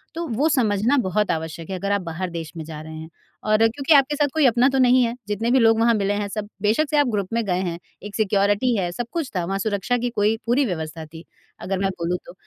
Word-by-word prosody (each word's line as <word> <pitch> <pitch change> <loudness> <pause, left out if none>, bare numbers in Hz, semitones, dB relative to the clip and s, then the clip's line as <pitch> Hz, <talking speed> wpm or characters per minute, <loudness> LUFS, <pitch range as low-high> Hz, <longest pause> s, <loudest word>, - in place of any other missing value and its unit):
तो 335 +1 -3
वो 265 +6 +1
समझना 235 -1 +2
बहुत 205 +1 0
आवश्यक 160 +1 -5
है 190 - -3
अगर 200 +2 -2
आप 200 -1 +1
बाहर 175 +1 -4
देश 165 -2 -6
में 160 - -5
जा 155 -1 -8
रहे 160 0 -9
हैं। 160 0 -8 0.3
और 215 0 +3
क्योंकि 235 +7 +2
आपके 280 +1 +4
साथ 295 0 +2
कोई 315 -2 +3
अपना 245 0 +4
तो 270 - -1
नहीं 255 0 +5
है 235 -1 0
जितने 215 +3 -1
भी 260 - +4
लोग 225 -1 +4
वहाँ 230 +1 +4
मिले 200 -1 0
हैं 205 0 -2
सब 205 +1 -5
बेशक 230 +9 +1
से 300 - +1
आप 290 - +4
ग्रुप 205 -4 -1
में 230 0 +1
गए 180 -2 0
हैं 170 -1 -3 0.3
एक 205 0 -8
सिक्योरिटी 205 +3 +2
है 180 -3 -1
सब 235 +6 -5
कुछ 325 -6 -3
था 180 - 0
वहाँ 195 +2 -2
सुरक्षा 205 +4 -1
की 245 +1 -2
कोई 215 -1 +1
पूरी 250 +4 +2
व्यवस्था 160 -5 -5
थी 160 +2 -12 0.4
अगर 190 0 -2
मैं 195 0 +1
बोलूँ 180 -1 -2
तो। - - -11
210 Hz, 260 wpm, -22 LUFS, 180-245 Hz, 0.4 s, नहीं